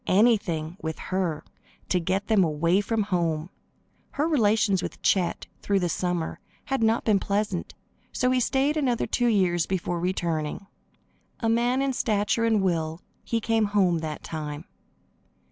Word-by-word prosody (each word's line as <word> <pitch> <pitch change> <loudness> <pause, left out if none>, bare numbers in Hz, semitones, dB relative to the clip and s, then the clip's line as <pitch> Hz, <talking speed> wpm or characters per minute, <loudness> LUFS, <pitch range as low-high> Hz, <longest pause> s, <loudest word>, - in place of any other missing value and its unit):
Anything, 185 -6 +2
with 160 -1 -4
her, 185 -5 -2 0.5
to 180 - +2
get 190 +4 -1
them 215 -3 +4
away 170 +4 +2
from 220 +1 0
home. 170 -4 -1 0.6
Her 295 +3 0
relations 215 - +2
with - - -6
Chet, 180 -3 +1 0.2
through 200 -1 +1
the 175 -2 0
summer, 175 -1 -2 0.3
had 270 -2 -1
not 225 +1 +2
been 210 -3 +4
pleasant, 200 -2 -2 0.4
so 250 0 +1
he 255 - +3
stayed 275 +5 +1
another 250 -6 +1
two 245 - 0
years 185 -6 +2
before 175 -2 -2
returning. 170 -1 -2 0.8
A 225 - +1
man 240 +3 +2
in 275 -1 0
stature 215 -1 +1
and 220 -3 +2
will 165 -3 -1 0.2
he 230 - -1
came 225 -1 +1
home 190 -5 +2
that 155 -1 -5
time. 150 0 -5
195 Hz, 150 wpm, -26 LUFS, 170-225 Hz, 0.8 s, them